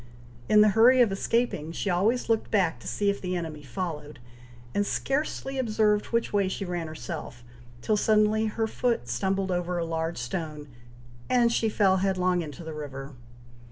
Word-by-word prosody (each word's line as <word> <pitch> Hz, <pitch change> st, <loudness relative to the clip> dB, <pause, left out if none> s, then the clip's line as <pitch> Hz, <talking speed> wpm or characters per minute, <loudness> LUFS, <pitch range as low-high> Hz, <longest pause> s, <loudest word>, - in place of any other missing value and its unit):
In 210 Hz, -, +7 dB
the 215 Hz, -, +6 dB
hurry 235 Hz, +5 st, +6 dB
of 230 Hz, -5 st, +4 dB
escaping, 195 Hz, -5 st, -1 dB
she 170 Hz, -, -4 dB
always 200 Hz, +7 st, +1 dB
looked 225 Hz, -1 st, +1 dB
back 180 Hz, -, +1 dB
to -, -, -10 dB
see 205 Hz, -1 st, +1 dB
if 200 Hz, -, -6 dB
the 180 Hz, -1 st, -2 dB
enemy 160 Hz, -4 st, -5 dB
followed, 150 Hz, 0 st, -5 dB, 0.6 s
and 205 Hz, -, +2 dB
scarcely 270 Hz, +3 st, -2 dB
observed 215 Hz, -3 st, +1 dB
which 230 Hz, -2 st, -1 dB
way 200 Hz, -2 st, +2 dB
she 195 Hz, +1 st, -3 dB
ran 175 Hz, -2 st, -3 dB
herself, 125 Hz, -5 st, -7 dB, 0.4 s
till 215 Hz, -, +2 dB
suddenly 215 Hz, +1 st, +3 dB
her 225 Hz, +1 st, -1 dB
foot 230 Hz, -, -1 dB
stumbled 190 Hz, +11 st, -1 dB
over 175 Hz, 0 st, -1 dB
a 170 Hz, -, -1 dB
large 165 Hz, 0 st, -2 dB
stone, 150 Hz, +3 st, -5 dB, 0.6 s
and 240 Hz, -2 st, +4 dB
she 225 Hz, -1 st, +1 dB
fell 195 Hz, -3 st, +3 dB
headlong 185 Hz, -2 st, +1 dB
into 155 Hz, 0 st, -8 dB
the 160 Hz, -1 st, -6 dB
river! 140 Hz, -2 st, -7 dB
190 Hz, 170 wpm, -27 LUFS, 160-215 Hz, 0.6 s, In